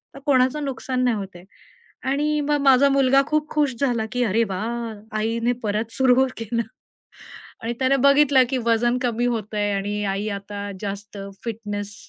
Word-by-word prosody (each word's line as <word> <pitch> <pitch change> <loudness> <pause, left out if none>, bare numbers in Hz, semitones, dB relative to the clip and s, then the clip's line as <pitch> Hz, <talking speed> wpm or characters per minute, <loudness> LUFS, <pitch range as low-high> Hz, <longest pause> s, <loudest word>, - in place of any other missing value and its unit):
तर - - -9
कोणाचं 270 +2 +2
नुकसान 255 -1 -2
नाही 240 -3 +2
होतंय." 190 -3 -8 0.7
आणि 300 +2 +1
मग 295 0 +1
माझा 275 0 +5
मुलगा 275 0 +4
खूप 305 0 0
खुश 295 -3 +1
झाला, 240 -5 +1
की 250 0 0
"अरे 225 +1 +2
वाह 225 +4 -3 0.2
आईने 230 +2 0
परत 215 +2 -2
सुरू 265 0 +4
केलं." 230 +1 -2 1.0
आणि 230 +1 -2
त्याने 265 +1 +3
बघितलं, 280 -2 +6
की 265 - 0
वजन 240 +2 +2
कमी 240 -1 0
होतंय 210 -3 -1
आणि 205 +1 -2
आई 200 +2 -2
आता 200 0 -7
जास्त 205 0 -6 0.3
फिटनेस 205 -3 -5
235 Hz, 155 wpm, -23 LUFS, 210-265 Hz, 1.0 s, बघितलं